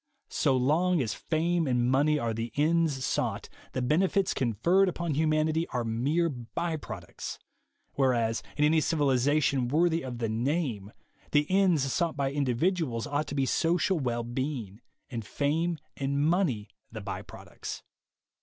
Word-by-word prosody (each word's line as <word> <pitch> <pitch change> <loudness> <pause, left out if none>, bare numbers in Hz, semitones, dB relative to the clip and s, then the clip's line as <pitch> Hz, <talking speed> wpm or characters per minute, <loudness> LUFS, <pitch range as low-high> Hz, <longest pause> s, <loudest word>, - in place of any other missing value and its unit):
So 130 - +2
long 165 +7 +2
as 115 -6 -1
fame 165 0 0
and 125 -1 +2
money 145 +4 +3
are 115 -5 -1
the 115 +1 -4
ends 150 -3 +2
sought, - - -1 0.2
the 130 - -1
benefits 185 +8 +2
conferred 170 - +2
upon 170 -2 -2
humanity 155 +2 +1
are 125 -2 -2
mere 135 +10 +1
by 160 +5 -3
products; 150 - -7 0.6
whereas, 120 -4 +1 0.2
in 150 - +4
any 155 +1 +4
civilization 140 -3 +2
worthy 165 +4 +2
of 125 -2 -6
the 115 -1 -1
name, 115 - -1 0.4
the 145 0 +4
ends 185 -6 +4
sought 170 -3 0
by 135 -1 0
individuals 140 -1 0
ought 145 +1 -1
to - - -5
be 135 -1 +2
social 175 +6 +1
well 120 -3 -1
being, 120 -4 -4 0.3
and 115 -3 -4
fame 160 +9 0 0.2
and 140 +2 0
money 150 - +1 0.2
the - - -6
by - - -5
products. - - -9
145 Hz, 145 wpm, -29 LUFS, 125-165 Hz, 0.6 s, in